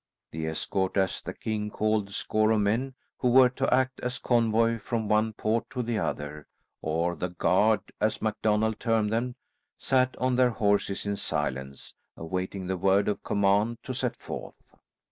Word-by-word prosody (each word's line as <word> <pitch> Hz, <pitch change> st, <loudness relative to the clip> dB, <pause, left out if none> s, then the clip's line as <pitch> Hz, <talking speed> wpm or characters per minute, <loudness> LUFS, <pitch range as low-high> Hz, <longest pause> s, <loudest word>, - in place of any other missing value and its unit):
The 80 Hz, 0 st, -4 dB
escort, 95 Hz, +4 st, -1 dB
as 95 Hz, -1 st, +1 dB
the -, -, -7 dB
king 105 Hz, -1 st, -3 dB
called 110 Hz, -1 st, 0 dB
the -, -, -16 dB
score 110 Hz, +1 st, +1 dB
of 110 Hz, -1 st, +3 dB
men, 120 Hz, +6 st, 0 dB, 0.2 s
who 125 Hz, -, +2 dB
were 130 Hz, +1 st, +7 dB
to 135 Hz, +2 st, -1 dB
act 130 Hz, 0 st, +2 dB
as 125 Hz, +1 st, -3 dB
convoy 115 Hz, -1 st, +2 dB
from 110 Hz, +1 st, -2 dB
one 110 Hz, +1 st, +2 dB
port 110 Hz, +2 st, -1 dB
to 125 Hz, -, -3 dB
the 115 Hz, -2 st, -1 dB
other; 75 Hz, -3 st, -4 dB, 0.3 s
or 85 Hz, +3 st, 0 dB
the 90 Hz, -, -3 dB
guard, 95 Hz, +5 st, +3 dB, 0.2 s
as 110 Hz, 0 st, +1 dB
MacDonald 110 Hz, 0 st, 0 dB
termed 110 Hz, -2 st, +1 dB
them, 120 Hz, +2 st, -1 dB, 0.4 s
sat 130 Hz, -1 st, +1 dB
on 130 Hz, -1 st, +1 dB
their 125 Hz, -1 st, +5 dB
horses 100 Hz, -3 st, 0 dB
in 100 Hz, 0 st, -1 dB
silence, 65 Hz, -4 st, -3 dB, 0.2 s
awaiting 90 Hz, +3 st, -4 dB
the 95 Hz, +1 st, -2 dB
word 95 Hz, +2 st, +3 dB
of 105 Hz, -, -1 dB
command 100 Hz, +3 st, +2 dB
to 130 Hz, -, -4 dB
set 125 Hz, -1 st, -2 dB
forth. -, -, -7 dB
110 Hz, 170 wpm, -28 LUFS, 95-115 Hz, 0.4 s, were